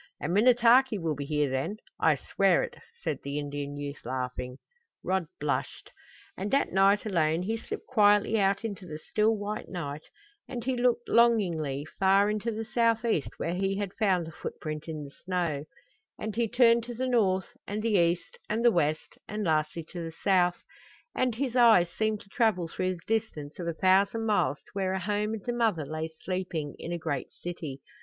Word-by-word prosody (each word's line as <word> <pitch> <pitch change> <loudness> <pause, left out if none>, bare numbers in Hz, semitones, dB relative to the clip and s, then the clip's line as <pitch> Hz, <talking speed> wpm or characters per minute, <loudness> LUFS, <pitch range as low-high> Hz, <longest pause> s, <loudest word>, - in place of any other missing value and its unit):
"And 170 - -2
Minnetaki 240 +2 +5
will 165 -4 -1
be 140 0 -5
here 150 0 +1
then 135 +10 -2 0.2
I 160 -2 +4
swear 190 +6 +2
it!" - - -6 0.3
said 155 -5 -1
the 140 +1 -4
Indian 145 0 -4
youth, 145 0 -6
laughing. 125 0 -4 0.5
Rod 185 -2 0
blushed. 145 -1 -3 0.4
And 195 +2 -3
that 275 +4 +2
night 195 +3 +4
alone 165 -4 +1
he 220 +4 -1
slipped 225 - -6
quietly 210 -2 +4
out 200 +2 +1
into 200 -4 -5
the 155 -2 -6
still, 215 +7 +1
white 205 +1 -4
night; 150 -4 -5 0.5
and 245 -3 -5
he 260 +1 0
looked, 245 -1 +1
longingly, 170 - +2
far 195 +2 +4
into 215 +2 -2
the 220 0 -4
southeast 230 - +1
where 170 - -2
he 195 +1 0
had 200 -2 -3
found 190 -6 +1
the 160 - -8
footprint 155 -1 -6
in 155 -2 -5
the 140 - -9
snow; 170 -6 -1 0.5
and 215 -1 -5
he 235 0 +1
turned 235 0 +4
to 240 0 -6
the 255 +3 -1
north, 200 -7 +1
and 210 +1 -3
the 230 - +1
east, 180 - +1
and 225 +2 0
the 240 - +7
west, 155 -4 -1
and 210 +1 -3
lastly 155 -1 0
to 175 -2 -5
the 165 - -5
south, 180 -2 +3 0.5
and 250 -3 0
his 255 0 -2
eyes 220 -9 +6
seemed 215 +1 -1
to 200 - -18
travel 205 -7 +1
through 185 +2 -2
the 170 - -14
distance 200 -10 -2
of 170 - -4
a 170 - -1
thousand 195 +6 +3
miles 175 -10 +2
to - - -23
where 190 -2 -1
a 190 - -1
home 210 +3 -1
and 210 - -10
a 240 - 0
mother 220 -10 +1
lay 155 +2 -3
sleeping 165 -2 -4
in 170 - -6
a 175 - -1
great 160 -5 -3
city. 155 -6 -7
190 Hz, 190 wpm, -28 LUFS, 160-220 Hz, 0.5 s, the